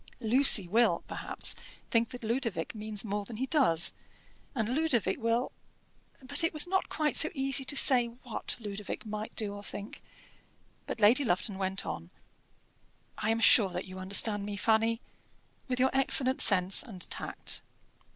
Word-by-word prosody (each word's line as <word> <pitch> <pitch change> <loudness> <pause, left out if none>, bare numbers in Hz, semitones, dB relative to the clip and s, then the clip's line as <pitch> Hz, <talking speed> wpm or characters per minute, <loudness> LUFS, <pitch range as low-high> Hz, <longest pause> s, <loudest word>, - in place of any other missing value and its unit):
Lucy 230 -4 +6
will, 230 +6 +1
perhaps, - - -2 0.4
think 230 0 +1
that 245 -2 -10
Ludovic 225 -7 -3
means 215 -1 -2
more 205 0 -3
than 215 +2 -10
he 260 - -2
does, 255 - +2 0.6
and 225 -4 -2
Ludovic 250 -7 -1
will 230 +2 -1 0.4
" - - -32
But 280 +5 0
it 330 -1 -1
was 305 - +4
not 380 +1 -2
quite 305 -1 -2
so 315 - +6
easy 270 0 0
to 285 - -1
say 250 -4 +6
what 240 0 -6
Ludovic 205 -1 -7
might 215 0 -7
do 210 -2 -2
or 205 - -9
think; 205 0 -8 0.9
but - - -6
Lady 225 +7 +4
Lufton 190 -2 -2
went 190 0 -3
on: 85 +1 -7 1.1
"I - - -2
am 225 0 0
sure 210 -3 +6
that 180 0 -6
you 185 0 -10
understand 200 +2 +1
me, 205 0 -6
Fanny, 225 +2 0 0.7
with 250 -1 -3
your 260 +1 +2
excellent 270 -1 +3
sense 190 -2 +3
and 190 -7 -9
tact. - - -4
225 Hz, 160 wpm, -29 LUFS, 200-260 Hz, 1.1 s, Lucy